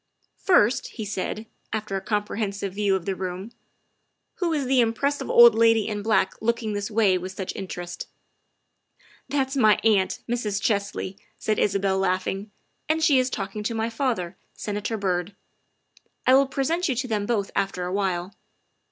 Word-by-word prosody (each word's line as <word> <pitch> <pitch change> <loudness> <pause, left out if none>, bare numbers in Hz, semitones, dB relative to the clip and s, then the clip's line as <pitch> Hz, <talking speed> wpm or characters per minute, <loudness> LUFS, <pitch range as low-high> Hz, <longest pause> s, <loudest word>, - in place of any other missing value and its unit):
' - - -52
' - - -41
" - - -52
First," 255 - +4
he 220 - -7
said, 205 +2 -3 0.3
after 215 -2 -3
a 195 - -2
comprehensive 200 -1 -2
view 200 -1 +1
of 185 -3 -3
the 195 - -1
room, 185 +3 -5 0.4
" - - -50
who 350 -3 +1
is 295 -4 0
the 260 0 +3
impressive 275 +5 0
old 235 -1 +8
lady 225 -1 +4
in 210 -1 -3
black 205 -3 +2
looking 230 -1 0
this 205 +1 -3
way 205 -4 +3
with 185 +1 -6
such 190 -1 -5
interest?" 175 -2 -6 0.6
" - - -32
That 270 -1 0
is 275 - -4
my 215 -5 +6
aunt, 205 -4 +2
Mrs. 220 -4 -1
Chesley," 200 -2 -2 0.2
said 215 - -1
Isabel, 195 -1 +1
laugh 185 -1 +1
ing, 195 +3 -4
' - - -45
' - - -47
and 320 0 +1
she 290 -5 +5
is 255 0 +1
talking 205 -2 -4
to 225 +2 -2
my 225 +1 -1
father, 225 -8 -1 0.2
Senator 210 +2 -3
Byrd; 185 -1 -1 0.9
I 255 - +5
will 275 +1 +6
present 320 +6 0
you 260 - +1
to 255 +2 -2
them 210 -3 -1
both 210 -5 0
after 185 -2 -1
awhile. 185 0 -1
210 Hz, 185 wpm, -25 LUFS, 195-235 Hz, 0.9 s, old